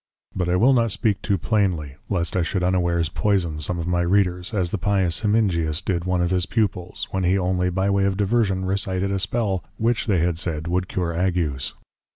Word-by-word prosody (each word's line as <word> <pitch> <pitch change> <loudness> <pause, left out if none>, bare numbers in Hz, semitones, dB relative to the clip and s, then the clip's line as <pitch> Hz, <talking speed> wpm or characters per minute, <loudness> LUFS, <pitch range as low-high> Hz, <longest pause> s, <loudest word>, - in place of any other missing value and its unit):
But 90 -2 -1
I 90 - +2
will 125 +9 +5
not 115 -2 +2
speak 105 0 0
too 100 -2 0
plainly 90 - 0
Lest 85 -4 0
I 90 - +2
should 90 +2 -1
unawares 85 -2 +1
Poison 90 -3 0
some 80 +4 0
of 85 0 -3
my 90 -1 +1
Readers, 90 0 +1
as 95 -6 -1
the 105 - -2
pious 95 -3 +1
Hemingius 95 -8 +1
did 90 -2 -2
one 90 -1 +1
of 90 - -1
his 90 -2 +1
Pupils, 95 -5 -2
when 95 0 -1
he 90 +2 +3
only 90 -1 0
by 95 +2 0
way 100 0 +2
of 95 -1 0
Diversion 100 -2 +1
recited 95 0 -1
a 100 - 0
Spell, 95 -1 -1
which, 115 +1 0
they 100 -4 +2
had 85 0 0
said, 80 -3 -2
would 90 +1 0
cure 90 -3 -2
Agues. 85 -7 -1
90 Hz, 205 wpm, -23 LUFS, 85-100 Hz, -, will